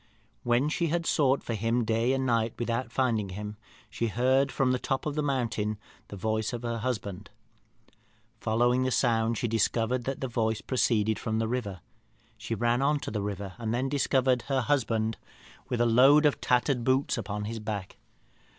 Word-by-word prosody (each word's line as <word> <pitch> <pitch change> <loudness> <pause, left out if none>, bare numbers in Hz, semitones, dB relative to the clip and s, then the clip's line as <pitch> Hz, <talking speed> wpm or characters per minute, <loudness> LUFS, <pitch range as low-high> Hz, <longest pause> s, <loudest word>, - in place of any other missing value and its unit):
"When 120 +4 +2
she 170 +2 0
had 170 +1 -1
sought 140 -4 +2
for 115 - -3
him 115 +2 0
day 115 +3 +1
and 135 0 0
night 115 -2 +1
without 120 0 -2
finding 115 -6 0
him, 105 +3 -6 0.3
she 115 +2 -2
heard 130 +5 +2
from 130 -2 +1
the 125 - 0
top 135 0 -2
of 150 -1 -2
a 155 - 0
mountain 115 -7 -1 0.3
the - - -8
voice 110 +3 -1
of 120 0 -5
her 115 -1 -2
husband. 105 -5 -4 1.1
Following 120 +3 +2
the 130 - +1
sound, 115 -2 +1
she 120 - -1
discovered 115 +2 0
that 135 0 -3
the 130 - -2
voice 110 -3 0
proceeded 110 -4 +1
from 110 -2 -2
the 115 0 0
river. 105 -7 -3 0.5
She 115 0 -4
ran 120 +6 +2
to - - -5
the 105 -1 -2
river, 100 -1 -4
and 115 0 -2
then 130 +2 -1
discovered 130 -2 +2
her 135 -2 +1
husband 115 -5 0 0.5
with 125 -3 -1
a 120 - +4
load 135 +6 +6
of 145 - +2
tattered 125 0 +1
boots 130 +3 +2
upon 105 -2 -4
his 115 +1 -4
back. 105 -3 -5
120 Hz, 180 wpm, -28 LUFS, 110-130 Hz, 1.1 s, load